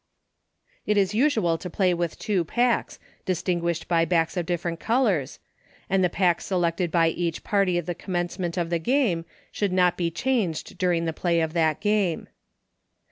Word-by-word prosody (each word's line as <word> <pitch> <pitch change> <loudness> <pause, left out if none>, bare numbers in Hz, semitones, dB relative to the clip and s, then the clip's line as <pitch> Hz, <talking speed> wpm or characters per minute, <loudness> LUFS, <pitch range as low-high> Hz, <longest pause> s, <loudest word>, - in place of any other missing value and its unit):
It 210 - +2
is 195 0 +2
usual 215 - +2
to 180 - -6
play 185 0 +2
with 170 -1 -2
two 195 -5 0
packs, 240 +7 0 0.3
distin 180 -1 0
guished 170 -1 -2
by 165 -1 +3
backs 165 0 +1
of 175 -2 -2
different 170 -1 -2
colors, 215 - +1 0.5
and 190 -1 +3
the 180 - +3
pack 175 -1 +1
selected 175 -1 0
by 165 0 +3
each 170 -1 -3
party 195 -4 +1
at 175 - -2
the 175 - -2
commence 175 +1 -4
ment 175 -1 -3
of 170 -1 -1
a 170 - +2
game, 205 - +1 0.3
should 205 -2 -1
not 180 -1 +3
be 170 -2 0
changed 190 -3 -2
dur 180 -2 +2
ing 170 0 0
the 165 - -1
play 170 +1 0
of 160 -1 -1
that 160 -1 +1
game. 205 -5 0
175 Hz, 185 wpm, -25 LUFS, 170-195 Hz, 0.5 s, by